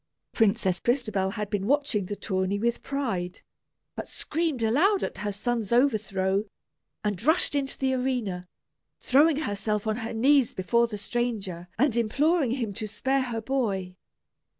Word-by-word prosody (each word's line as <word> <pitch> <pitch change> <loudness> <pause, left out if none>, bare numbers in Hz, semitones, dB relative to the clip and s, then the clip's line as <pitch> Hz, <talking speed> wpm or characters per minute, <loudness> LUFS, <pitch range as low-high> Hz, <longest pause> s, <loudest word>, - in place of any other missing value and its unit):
Princess 200 -5 +2
Crystabell 215 -7 0
had 210 -1 -4
been 200 -1 -1
watching 275 -8 +1
the 205 - -3
tourney 190 0 -1
with 235 +3 0
pride, 225 -11 -3 0.5
but - - -5
screamed 310 -6 -2
aloud 345 - +3
at - - -4
her 205 0 -2
son's 225 +1 -2
overthrow, 210 -6 +2 0.6
and 205 -4 -1
rushed 315 +2 +2
into 275 -1 -1
the 265 -1 +1
arena, 245 -9 -2 0.5
throwing 295 +4 +4
herself 210 -3 -2
on 215 0 0
her 230 -1 -4
knees 265 +2 +4
before 235 +6 +2
the 215 -2 -5
stranger 200 -6 -3
and 250 -1 +2
imploring 280 +6 +2
him 230 -4 -2
to 215 +1 -4
spare 265 +6 0
her 235 -3 -3
boy. 210 -8 -1
225 Hz, 150 wpm, -27 LUFS, 200-265 Hz, 0.6 s, throwing